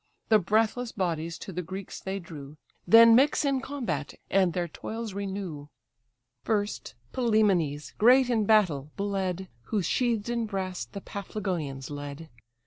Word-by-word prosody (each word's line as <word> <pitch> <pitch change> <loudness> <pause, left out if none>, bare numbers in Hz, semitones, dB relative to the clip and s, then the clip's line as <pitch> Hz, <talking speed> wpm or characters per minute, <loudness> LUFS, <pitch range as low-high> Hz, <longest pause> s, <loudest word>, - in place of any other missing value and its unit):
The 215 -1 +6
breathless 225 +5 +1
bodies 165 -3 -2
to 190 - -8
the 180 - -2
Greeks 190 +2 -7
they 190 +1 -3
drew, 150 -5 -10 0.3
Then 230 0 +9
mix 275 +5 +4
in 275 -2 +1
combat, 185 - -4 0.2
and 190 -2 +4
their 175 -1 -1
toils 220 +6 -6
renew. 190 -7 -5 0.8
First, 205 - -2 0.2
Pylæmenes, 200 - +1
great 250 +3 +6
in 225 -4 +1
battle, 180 -10 +3
bled, 190 -2 -2 0.2
Who 205 - -1
sheathed 235 0 0
in 235 -1 -1
brass 190 -3 -3
the 200 - -9
Paphlagonians 175 -11 -4
led. 145 +2 -7
195 Hz, 135 wpm, -28 LUFS, 165-220 Hz, 0.8 s, Then